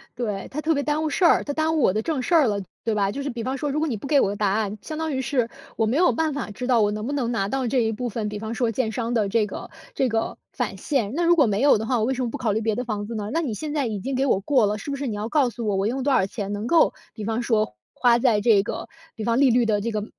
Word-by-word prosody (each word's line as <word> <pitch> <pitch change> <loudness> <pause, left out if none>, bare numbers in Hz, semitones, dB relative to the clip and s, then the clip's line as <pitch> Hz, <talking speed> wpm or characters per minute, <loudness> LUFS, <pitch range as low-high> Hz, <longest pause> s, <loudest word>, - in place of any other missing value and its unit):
对， 210 -5 -3
他 295 - -4
特 320 +1 +2
别 285 -1 -1
耽 300 +1 0
误 310 - 0
事 365 - -1
儿， 340 - +6
他 285 - -2
耽 315 +1 +1
误 - - +2
我 185 - +4
的 215 - 0
正 295 +2 -2
事 340 - +1
儿 305 -6 +5
了， 205 -2 -1 0.2
对 225 - 0
吧？ 200 -2 +1
就 280 +6 -4
是 285 - -2
比 240 -3 -5
方 260 +3 -2
说， 290 +1 -2
如 295 - -1
果 320 - 0
你 255 - -1
不 210 - -8
给 285 0 +4
我 - - +3
个 200 - -2
答 205 -1 +1
案， 210 +1 -1
相 310 - -6
当 320 -1 -2
于 260 - -1
是， 245 -2 0 0.3
我 225 - +2
没 225 +4 0
有 355 +4 +4
办 320 -2 0
法 270 -7 -4
知 245 +4 -5
道， 245 -3 +4
我 205 0 +2
能 215 +2 -4
不 285 - -2
能 250 -5 -1
拿 195 -5 0
到 265 +4 -1
这 255 +2 +1
一 220 - 0
部 245 +3 -3
分， 220 -1 -3
比 210 0 -4
方 220 +2 -5
说 235 0 0
建 225 0 -1
商 230 +1 -2
的 215 -4 +1
这 220 +1 +2
个 - - -7 0.3
这 265 -9 +1
个 225 0 -1
返 - - -3
现， 245 -8 -1
那 345 - +1
如 345 0 +5
果 295 - +6
没 210 -1 0
有 280 -3 +6
的 220 - -3
话， 250 +2 +1
我 - - +1
为 265 - 0
什 260 - -3
么 240 - -1
不 - - -5
考 225 -4 0
虑 210 - 0
别 220 -1 0
的 245 - -2
房 210 -4 -4
子 230 - -5
呢？ 210 -1 -3
那 330 - +1
你 270 -9 -2
现 300 +7 -5
在 285 -4 0
已 215 -3 -3
经 265 +7 -3
给 265 +2 +1
我 200 -7 +2
过 255 +1 +3
了， 205 +1 0
是 280 - -6
不 280 - -3
是 275 0 -3
你 220 - -3
要 210 +2 -4
告 270 -1 +3
诉 235 0 -6
我， 205 - +1
我 195 +2 +1
用 260 +3 -2
多 280 0 +2
少 190 - +3
钱 200 0 -5
能 205 +2 -3
够 335 +5 +4 0.2
比 215 - -7
方 225 +3 -1
说， 215 - 0 0.2
花 240 -1 +3
在 235 -4 +3
这 210 -2 +5
个 - - -5 0.3
比 220 - -5
方 230 +2 +1
利 275 -2 +5
率 240 0 +3
的 215 -2 +1
这 230 +3 -2
个 210 -1 -2
235 Hz, 370 characters per minute, -24 LUFS, 215-275 Hz, 0.3 s, 儿